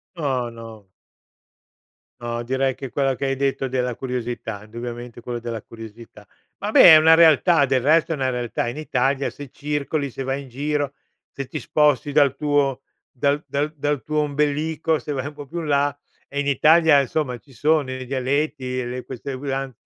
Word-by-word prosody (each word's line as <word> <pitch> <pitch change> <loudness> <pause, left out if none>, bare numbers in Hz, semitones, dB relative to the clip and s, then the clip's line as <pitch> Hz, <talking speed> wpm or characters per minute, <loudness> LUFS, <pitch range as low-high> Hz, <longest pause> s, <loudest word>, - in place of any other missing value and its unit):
No, 135 -7 -1
no. 115 -3 -11 1.3
No, 120 0 -3
direi 130 +2 0
che 135 +1 -7
quello 135 +1 0
che 135 - -4
hai 135 0 0
detto 135 0 -1
della 125 -1 -1
curiosità, 120 -4 -5
indubbiamente, 120 +2 -8
quello 120 0 -4
della 115 -2 -5
curiosità. 115 -1 -12 0.3
Vabbè, 200 -4 +7
è - - +10
una 160 +1 +6
realtà, 165 -1 +5
del 130 -1 +2
resto 155 +5 +3
è - - -1
una 130 -2 -1
realtà 120 -1 -2
in 120 +4 -5
Italia 135 -2 0
se 145 -2 -10
circoli, 145 0 -2
se 135 - -6
vai 135 +1 -2
in 135 - -12
giro, 145 +2 -2 0.4
se 140 - -6
ti 155 - -5
sposti 145 +1 +2
dal 140 -2 +3
tuo 140 -2 0 0.3
dal 140 +3 0
dal 145 +2 -1
dal 145 -1 -1
tuo 155 0 -1
ombelico, 150 +2 0
se 150 - -6
vai 135 -1 -3
un 145 - -8
po’ 145 -1 -9
più 170 +5 -6
in 160 - -5
là, 145 -1 +1 0.3
eh 140 - -4
in 145 - -1
Italia, 155 +2 +5
insomma, 135 -1 -1
ci 135 +3 -21
sono 150 0 +1
i 130 0 -5
dialetti, 130 -1 -1
le 125 +1 -5
queste 130 +2 -6
usan 135 0 -3
135 Hz, 180 wpm, -22 LUFS, 125-150 Hz, 1.3 s, è